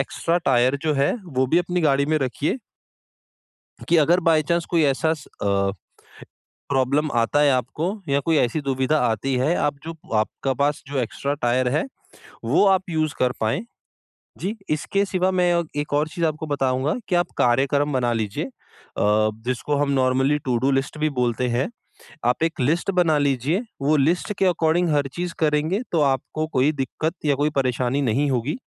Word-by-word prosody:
Extra 165 +5 -1
tyre 130 -4 +2
जो 155 -1 +1
है 140 +1 +2
वो 130 -6 0
भी 165 +7 +3
अपनी 180 0 -1
गाड़ी 140 -1 +2
में 155 0 +1
रखिए। 140 - -1 1.3
कि 170 - +4
अगर 170 +4 +4
बाए 165 -2 +3
चांस 170 -1 +1
कोई 165 -3 +3
ऐसा 145 +3 +2
स 150 -3 -11 0.2
अ, 100 -1 +1 1.0
प्रॉब्लम 140 +3 +1
आता 115 +5 +2
है 145 - +5
आपको 150 - -1
या 140 +1 +2
कोई 165 -2 +3
ऐसी 125 +3 +1
दुविधा 135 +2 0
आती 130 +5 -1
है 150 +7 +2
आप 145 - 0
जो 165 0 -6 0.2
आपका 135 +5 -1
पास 145 0 0
जो 140 -1 -3
एक्स्ट्रा 140 +4 -2
टायर 125 +1 +2
है, - - +1 0.6
वो - - +3
आप 190 -1 +3
यूज़ 155 -2 0
कर 125 -1 +2
पाएँ। 115 - 0 0.7
जी, 205 +5 -3
इसके 195 +7 0
सिवा 185 0 0
मैं 180 -1 +2
अग 170 -2 0
एक 145 0 -3
और 150 +2 +2
चीज़ 170 +1 -2
आपको 155 0 -2
बताऊँगा 135 0 0
कि 180 - +2
आप 175 - +1
कार्यक्रम 140 +4 +2
बना 120 -2 +1
लीजिए 115 +5 -2
अ, - - -10 0.9
जिसको 125 +4 -1
हम 145 0 +1
नॉर्मली 135 +2 +2
टूडू 130 +2 +1
लिस्ट 135 +3 -1
भी 155 0 +1
बोलते 125 0 0
हैं। 120 - 0 0.6
आप 125 +6 +1
एक 165 -2 -1
लिस्ट 165 +9 +1
बना 175 -5 +2
लीजिए, 140 - +1 0.2
वो 150 +2 +3
लिस्ट 170 +8 +1
के 195 - +2
अकॉर्डिंग 170 0 +2
हर 145 -1 +1
चीज़ 175 -1 -4
करेंगे 155 +6 +1
तो 165 - +2
आपको 140 +3 0
कोई 140 -1 +2
दिक्कत 145 +4 -3
या 145 -2 +3
कोई 150 +2 +1
परेशानी 130 0 0
नहीं 135 +4 +1
होगी। 125 - -1
145 Hz, 180 wpm, -23 LUFS, 130-165 Hz, 1.3 s, है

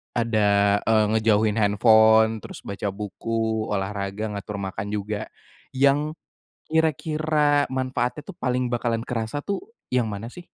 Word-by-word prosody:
ada, 100 -3 +3
eee, 110 -1 +3
ngejauhin 110 -1 +2
handphone, 110 +1 +5
terus - - -9
baca 100 0 -4
buku, 110 +2 -2
olahraga, 100 +1 -3
ngatur 100 +1 -5
makan 95 +1 -4
juga. 105 +1 -3 0.5
Yang, 140 +3 +2 0.5
kira-kira 155 -1 +1
manfaatnya 130 +1 -2
tuh, 195 - -9
paling 125 -3 -1
bakalan 115 -1 -1
kerasa 115 +3 -3
tuh, 200 - -3 0.3
yang 120 -3 +2
mana 105 +2 -5
sih? 175 -1 -11
110 Hz, 125 wpm, -24 LUFS, 105-130 Hz, 0.5 s, handphone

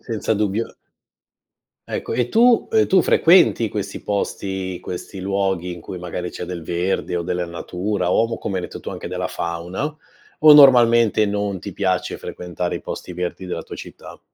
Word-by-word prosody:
Senza 110 -1 -2
dubbio. 105 +2 -2 1.1
Ecco, - - -3
e 125 -1 0
tu, 235 - +4
uhm, 440 -1 +3
tu 190 - +5
frequenti 165 - +4
questi 100 -1 -5
posti, 95 -2 -3
questi 95 +1 -7
luoghi 95 -2 -1
in 85 - -9
cui 90 - -7
magari 90 0 -5
c'è - - -8
del 85 -2 -6
verde 90 +2 -1
o 85 - -1
della 90 0 -2
natura 90 +2 -3
o, 115 - +3
co 115 - -5
come 95 - -3
hai 90 - -2
detto - - -7
tu, - - -6
anche - - -7
della - - -3
fauna, 90 - -4 0.4
o 155 0 +9
normalmente 120 -6 +6
non 100 -2 -2
ti 100 - -7
piace 95 -1 -1
frequentare 90 0 -5
i - - -4
posti 90 - -7
verdi 90 +1 -4
della 90 - -4
tua - - -9
città? - - -11
95 Hz, 175 wpm, -21 LUFS, 90-115 Hz, 1.1 s, o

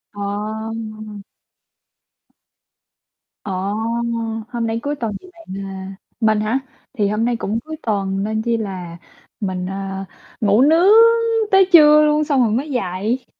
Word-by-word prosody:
Ồ! 215 +1 -5 2.2
Ồ! 200 - -5 1.0
Hôm 235 -2 -2
nay 225 +1 -2
cuối 290 +1 -2
tuần 225 -5 -3
thì 370 - -15
bạn, 335 -1 -17 0.2
ờ 195 - -7 0.5
mình 215 -2 +2
hả? 225 +5 0 0.3
Thì 210 -5 0
hôm 215 +3 0
nay 240 -1 +1
cũng 225 0 -2
cuối 315 +5 -8
tuần 195 -3 -1
nên 220 +1 -1
chi 235 0 0
là 185 -5 -6 0.4
mình, 185 -3 -3
ơ, 195 0 -5 0.4
ngủ 210 +3 +4
nướng 330 +7 +5 0.6
tới 385 -1 +5
trưa 300 -2 +8
luôn 300 0 +2
xong 280 -4 +1
rồi 220 - +1
mới 280 +6 -1
dậy. 225 +3 -2
220 Hz, 140 wpm, -19 LUFS, 200-260 Hz, 2.2 s, trưa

